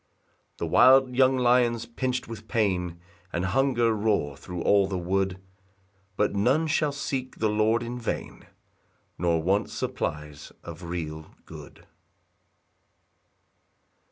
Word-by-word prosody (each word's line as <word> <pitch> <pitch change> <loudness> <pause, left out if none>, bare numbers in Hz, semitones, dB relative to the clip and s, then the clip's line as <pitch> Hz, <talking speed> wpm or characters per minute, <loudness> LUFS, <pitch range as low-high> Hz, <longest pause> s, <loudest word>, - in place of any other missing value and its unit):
6 - - -44
The - - -3
wild 130 +8 +5
young 130 0 +4
lions, 120 -2 +2
pinch'd 125 +2 -3
with 110 -1 -9
pain 90 -6 -1 0.3
And 85 +2 -2
hunger, 120 +2 +2
roar 105 -10 0
thro' 90 +4 -7
all 100 -1 +4
the 95 -1 -3
wood; 95 +1 -1 0.8
But 105 - +1
none 125 +11 +2
shall 150 -1 +1
seek 135 -2 -4
the 110 - +1
Lord 110 +2 +2
in 120 +1 -5
vain, 115 - -5 0.7
Nor 85 -2 +1
want 95 +4 +1
supplies 75 0 -5
of 85 0 -9
real 80 -3 -6
good. - - -12
105 Hz, 125 wpm, -26 LUFS, 90-125 Hz, 0.8 s, wild